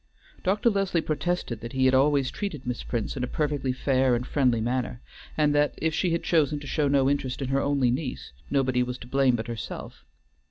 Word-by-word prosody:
Dr. 205 Hz, +5 st, +2 dB
Leslie 195 Hz, -4 st, +1 dB
protested 155 Hz, -6 st, -2 dB
that 115 Hz, 0 st, -7 dB
he 130 Hz, 0 st, +2 dB
had 130 Hz, -, +4 dB
always 140 Hz, 0 st, +3 dB
treated 180 Hz, -10 st, -5 dB
Miss 125 Hz, -1 st, -3 dB
Prince 115 Hz, -3 st, -3 dB
in 130 Hz, -, -3 dB
a -, -, -1 dB
perfectly 145 Hz, -3 st, -1 dB
fair 130 Hz, -1 st, +2 dB
and 120 Hz, +1 st, -2 dB
friendly 125 Hz, -4 st, +2 dB
manner, 120 Hz, +1 st, -2 dB, 0.4 s
and 150 Hz, -1 st, +3 dB
that 145 Hz, 0 st, +2 dB
if 160 Hz, 0 st, 0 dB
she 180 Hz, -, +1 dB
had 170 Hz, 0 st, -1 dB
chosen 150 Hz, -3 st, +2 dB
to 145 Hz, -, -10 dB
show 145 Hz, +1 st, 0 dB
no 140 Hz, -1 st, +3 dB
interest 135 Hz, -2 st, -1 dB
in 135 Hz, -2 st, -3 dB
her 135 Hz, +1 st, +2 dB
only 140 Hz, -4 st, +2 dB
niece, 130 Hz, 0 st, -4 dB, 0.2 s
nobody 130 Hz, -3 st, +2 dB
was 125 Hz, 0 st, -2 dB
to -, -, -11 dB
blame 135 Hz, -1 st, +3 dB
but 110 Hz, -1 st, -3 dB
herself. 115 Hz, -1 st, -7 dB
135 Hz, 210 wpm, -26 LUFS, 125-150 Hz, 0.4 s, had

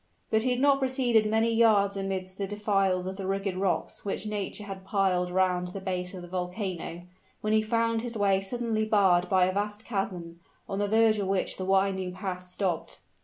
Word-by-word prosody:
But 220 Hz, -, +3 dB
he 255 Hz, -, +1 dB
had 250 Hz, 0 st, +1 dB
not 280 Hz, 0 st, +4 dB
proceeded 255 Hz, -5 st, +2 dB
many 225 Hz, +1 st, +2 dB
yards 210 Hz, -3 st, +4 dB
amidst 190 Hz, -1 st, -3 dB
the 200 Hz, -, -1 dB
defiles 195 Hz, -3 st, +1 dB
of 190 Hz, +1 st, -5 dB
the 195 Hz, -2 st, -4 dB
rugged 195 Hz, -1 st, -1 dB
rocks 190 Hz, -1 st, -1 dB
which 200 Hz, +1 st, -3 dB
nature 210 Hz, 0 st, -4 dB
had 195 Hz, -2 st, -7 dB
piled 190 Hz, -2 st, +1 dB
around 180 Hz, -1 st, +1 dB
the 180 Hz, +2 st, -6 dB
base 185 Hz, -1 st, -3 dB
of 180 Hz, -, -8 dB
the -, -, -9 dB
volcano, 180 Hz, -1 st, -4 dB, 0.4 s
when 215 Hz, 0 st, 0 dB
he 220 Hz, -, +5 dB
found 230 Hz, +1 st, +1 dB
his 235 Hz, -1 st, -5 dB
way 195 Hz, -2 st, +3 dB
suddenly 225 Hz, +1 st, -1 dB
barred 190 Hz, -4 st, +3 dB
by 185 Hz, -1 st, +4 dB
a 185 Hz, -, 0 dB
vast 210 Hz, +2 st, -3 dB
chasm, 180 Hz, -6 st, -4 dB, 0.3 s
on 195 Hz, -1 st, -3 dB
the 205 Hz, -, +1 dB
verge 220 Hz, 0 st, +4 dB
of 200 Hz, -, -1 dB
which 195 Hz, -1 st, -1 dB
the 185 Hz, -, -4 dB
winding 190 Hz, -1 st, +1 dB
path 185 Hz, -1 st, -5 dB
stopped. 180 Hz, -2 st, -3 dB
195 Hz, 200 wpm, -28 LUFS, 185-215 Hz, 0.4 s, he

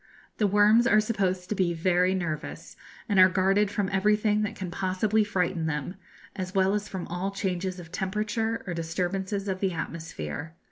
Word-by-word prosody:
The 210 Hz, -, +4 dB
worms 210 Hz, +4 st, +5 dB
are 215 Hz, -5 st, +5 dB
supposed 190 Hz, -4 st, -1 dB
to -, -, +1 dB
be 175 Hz, -3 st, +1 dB
very 180 Hz, +2 st, +2 dB
nervous, 160 Hz, -4 st, -4 dB, 0.3 s
and 200 Hz, -3 st, +2 dB
are 185 Hz, 0 st, +8 dB
guarded 195 Hz, +2 st, +2 dB
from 205 Hz, -1 st, -1 dB
everything 210 Hz, +2 st, +2 dB
that 215 Hz, +1 st, -2 dB
can 185 Hz, -5 st, -5 dB
possibly 195 Hz, +4 st, +1 dB
frighten 180 Hz, -4 st, -1 dB
them, 150 Hz, +2 st, -3 dB, 0.4 s
as 185 Hz, 0 st, -5 dB
well 190 Hz, 0 st, +3 dB
as 210 Hz, 0 st, -2 dB
from 190 Hz, -2 st, -5 dB
all 180 Hz, +3 st, -2 dB
changes 185 Hz, -2 st, -3 dB
of 170 Hz, -1 st, -11 dB
temperature 210 Hz, +4 st, -2 dB
or 180 Hz, -, -3 dB
disturbances 190 Hz, +4 st, -2 dB
of 190 Hz, -1 st, -2 dB
the 190 Hz, -2 st, 0 dB
atmosphere. 160 Hz, -, -5 dB
190 Hz, 175 wpm, -27 LUFS, 180-205 Hz, 0.4 s, are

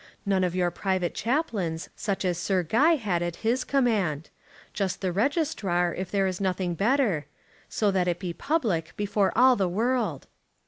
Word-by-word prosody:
None 195 Hz, -2 st, +2 dB
of 180 Hz, -1 st, -1 dB
your 175 Hz, -1 st, +1 dB
private 185 Hz, -1 st, -1 dB
chaplains, 220 Hz, -, -2 dB
such 200 Hz, -2 st, -2 dB
as 175 Hz, -2 st, 0 dB
Sir 185 Hz, 0 st, 0 dB
Guy 285 Hz, -, +4 dB
had 200 Hz, -, -1 dB
at 175 Hz, -1 st, -2 dB
his 250 Hz, +3 st, +2 dB
command. 205 Hz, -, 0 dB, 0.4 s
Just 195 Hz, -3 st, -2 dB
the 185 Hz, -2 st, 0 dB
registrar, 195 Hz, -, 0 dB
if 185 Hz, 0 st, -5 dB
there 195 Hz, 0 st, +1 dB
is 185 Hz, 0 st, -2 dB
nothing 185 Hz, -2 st, -1 dB
better, 210 Hz, -, +1 dB, 0.4 s
so 210 Hz, -2 st, +1 dB
that 185 Hz, -2 st, +1 dB
it 175 Hz, -1 st, 0 dB
be 175 Hz, -2 st, -4 dB
public, 210 Hz, -, -1 dB
before 205 Hz, -1 st, +1 dB
all 255 Hz, +2 st, +6 dB
the 190 Hz, -4 st, 0 dB
world." 220 Hz, -, -1 dB
190 Hz, 170 wpm, -26 LUFS, 175-230 Hz, 0.4 s, all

